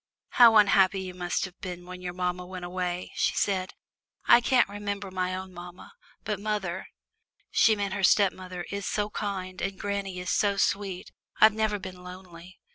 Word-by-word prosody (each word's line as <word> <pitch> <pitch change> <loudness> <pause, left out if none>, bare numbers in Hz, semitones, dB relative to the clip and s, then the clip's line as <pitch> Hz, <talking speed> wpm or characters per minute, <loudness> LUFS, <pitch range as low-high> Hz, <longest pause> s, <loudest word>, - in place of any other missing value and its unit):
"How 235 -2 +7
unhappy 195 -2 +5
you 185 -1 -6
must 180 0 -2
have 190 -1 -12
been 180 -2 -6
when 180 0 -9
your 180 -1 -4
mamma 180 0 -2
went 185 -1 -7
away," 180 0 -3
she - - 0
said. 190 -2 -1 0.5
"I 240 - +7
can't 255 +1 +3
remember 200 -1 -5
my 185 0 -2
own 190 0 -7
mamma, 175 +1 -11 0.3
but 210 -2 -3
mother" 200 -4 -3 0.6
she 220 -2 +4
meant 200 -2 -2
her 200 - -3
stepmother 185 -3 +2
"is 200 0 -4
so 210 0 -1
kind, 190 -3 -4
and 195 -1 -3
granny 200 -2 -3
is 180 0 -3
so 200 -2 +2
sweet. 195 -2 -1 0.3
I've 215 -1 +7
never 215 -1 0
been 185 -2 -9
lonely." 180 -1 -12
190 Hz, 175 wpm, -27 LUFS, 180-205 Hz, 0.6 s, How